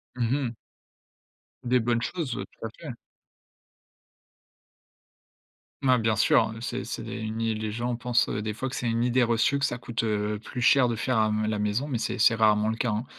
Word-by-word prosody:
Mmh 120 -1 -1
mh. 135 -4 -1 1.1
Des 125 +1 +3
bonnes 120 0 0
choses, 155 -5 -3
ouais, - - -4
tout - - -6
à - - -3
fait. - - -6 2.9
Mais 130 -2 +5
bien 110 -2 +1
sûr, 110 +2 +4
hein, 110 0 -5
c'est 125 +1 -3
c'est - - -5
une 110 -1 -5
i 115 -1 0
les 110 0 -3
gens 120 +2 -2
pensent, 120 0 +1
des 105 0 -2
fois, 130 +5 -4
que 130 - -6
c'est 120 - -2
une 115 +1 +1
idée 125 +1 +3
reçue, 115 +4 +2
que 140 - +1
ça 125 - -2
coûte, 120 -1 -3
heu, 105 -1 -1
plus 125 +3 -6
cher 125 0 +5
de 115 - -1
faire 125 +2 0
à 110 0 +3
m 105 0 0
la 105 - -1
maison, 105 +7 -1
mais 130 - -1
c'est 120 +2 -3
c'est 115 +1 +5
rarement 105 -1 +3
le 110 - -1
cas, 115 0 -1
hein. 105 +4 -2
115 Hz, 210 wpm, -27 LUFS, 110-125 Hz, 2.9 s, Mais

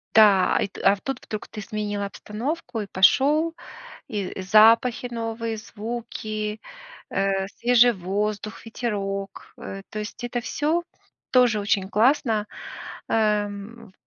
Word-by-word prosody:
Да, 205 -4 +6
а, - - +2
ит 200 - -6
а, 195 - +6
в 195 - -17
тут 270 - -5
вдруг 215 - -5
ты 210 - -8
сменил 205 0 -3
обстановку 230 +5 -4
и 200 - -6
пошел, 295 - +4 0.5
и 195 -3 -4
запахи 225 +5 +5
новые, 230 -1 -3
звуки, 215 -1 -5 0.5
э, 195 0 0
свежий 245 0 +5
воздух, 205 +4 -3
ветерок. 200 -4 -4
Э, 195 0 -7
то 215 - -5
есть 210 +3 -7
это 240 0 -2
всё 310 +7 0 0.5
тоже 245 -4 +4
очень 200 -2 0
классно, 220 -1 +2 0.6
эм, 210 0 -1
215 Hz, 125 wpm, -24 LUFS, 200-235 Hz, 0.6 s, Да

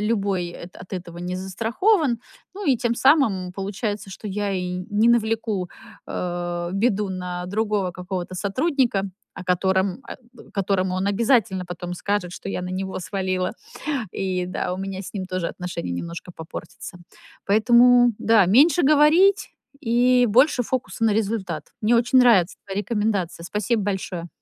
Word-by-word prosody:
любой, 200 -4 0
э, 170 - -9
от 180 - -13
этого 175 -2 -6
не 180 +1 -4
застрахован. 235 - +1 0.4
Ну 405 -1 -6
и 270 -3 +4
тем 235 0 0
самым, 225 - +3
получается, 200 +1 -4
что 200 - -8
я 200 0 -2
и 180 -1 -3
не 210 +3 +3
навлеку, 220 -5 +1 0.4
а, 175 -1 -3
беду 205 0 +1
на 180 -1 -4
другого 205 -1 -1
какого-то 180 0 -5
сотрудника, 235 - 0 0.3
о 195 - -8
котором 190 +4 +1
о 240 -1 -13
которому 190 -2 0
он 185 +1 -1
обязательно 205 -3 +2
потом 175 0 -6
скажет, 190 -1 -2
что - - -8
я 180 - -3
на 180 - -5
него 190 +1 -3
свалила. 185 -1 -2 0.6
И 185 -2 -2
да, 180 0 -3
у - - -6
меня 195 0 -4
с - - -9
ним 190 -2 -3
тоже 185 -2 -2
отношения 175 - -5
немножко 170 - -6
попортятся. 165 +2 -9 0.5
Поэтому, 240 +3 +5
да, 225 -3 +4
меньше 295 - +5
говорить 310 +7 +4 0.3
и 245 +1 +3
больше 250 +4 +4
фокуса 245 -1 -2
на 220 - +4
результат. 195 -8 -2
Мне 225 +2 +3
очень 245 +2 +3
нравится 220 -8 +5
твоя 195 0 -2
рекомендация. 205 -6 -2
Спасибо 210 +4 -1
большое. 190 -3 -3
195 Hz, 150 wpm, -23 LUFS, 180-230 Hz, 0.6 s, Поэтому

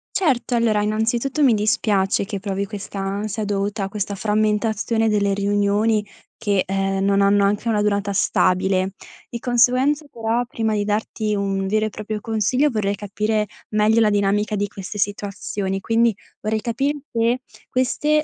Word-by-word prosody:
Certo, 270 -9 +1
allora, 225 -3 +2
innanzitutto, 230 +7 0
mi 240 -5 +5
dispiace, 205 -1 +1
che 200 -1 -4
provi 200 0 -3
questa 200 -1 -7
ansia, 200 +2 -3
dovuta 200 +1 -1
a - - -5
questa 205 0 -3
frammentazione 215 +2 +1
delle 200 -1 +2
riunioni, 205 +2 +1 0.3
che, 200 -3 +1
ehm, 195 0 0
non 200 0 +3
hanno 200 0 +4
anche 205 +3 0
una 210 -2 +2
durata 200 -1 0
stabile. 190 0 +2 0.4
Di 235 - -6
conseguenza, 255 +5 +2
però, 230 +1 -1
prima 220 -2 -1
di 205 - 0
darti 215 0 -1
un 195 -1 -1
vero 215 +2 +1
e - - -4
proprio 215 0 -5
consiglio, 225 +6 +1
vorrei 210 -5 0
capire 210 +1 -1 0.2
meglio 215 +2 +3
la 215 - +4
dinamica 205 +1 +1
di 205 0 0
queste 200 +1 -7
situazioni, 200 -1 -2
quindi, 225 +1 +2 0.3
vorrei 215 0 -1
capir 255 +6 0 0.2
se, 230 +2 +1 0.3
queste 300 +4 +1
210 Hz, 155 wpm, -21 LUFS, 200-225 Hz, 0.4 s, mi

